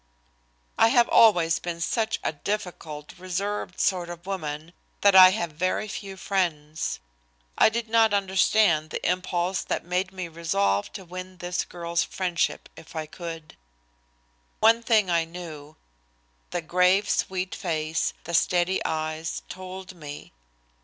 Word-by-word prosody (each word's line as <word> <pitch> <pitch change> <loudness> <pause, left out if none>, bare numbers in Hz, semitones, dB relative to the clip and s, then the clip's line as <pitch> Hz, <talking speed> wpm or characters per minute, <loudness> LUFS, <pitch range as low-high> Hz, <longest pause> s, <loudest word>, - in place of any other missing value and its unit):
I 225 - +7
have 240 0 +4
always 175 -8 +5
been 170 -1 -5
such 220 +5 0
a - - -1
difficult, 160 -4 -5
reserved 185 +1 -3
sort 180 -2 +1
of 175 0 -9
woman 160 -4 -5 0.3
that 200 -1 +5
I 185 -1 +11
have 180 -4 -2
very 185 +7 -1
few 200 -2 -7
friends. 160 -6 -2 0.6
I - - +6
did 230 +1 -3
not 225 -1 +4
understand 195 -4 +3
the - - -3
impulse 180 0 0
that - - -3
made 180 +2 -1
me 185 -2 -5
resolve 100 -13 0
to 190 -3 -8
win 185 +1 -8
this 175 0 -2
girl's 170 -1 -2
friendship 180 -3 -1
if 160 - -14
I 160 -1 -3
could. 165 0 -8 1.0
One 225 +1 +5
thing 215 -5 +3
I 170 -1 +3
knew. 160 -3 -9 0.7
The 175 - -3
grave, 180 +4 +3
sweet 185 0 -1
face, 160 -2 -1
the 170 - -7
steady 175 +3 +2
eyes 155 0 -3
told 185 0 -8
me. 145 - -10
180 Hz, 140 wpm, -26 LUFS, 165-190 Hz, 1.0 s, I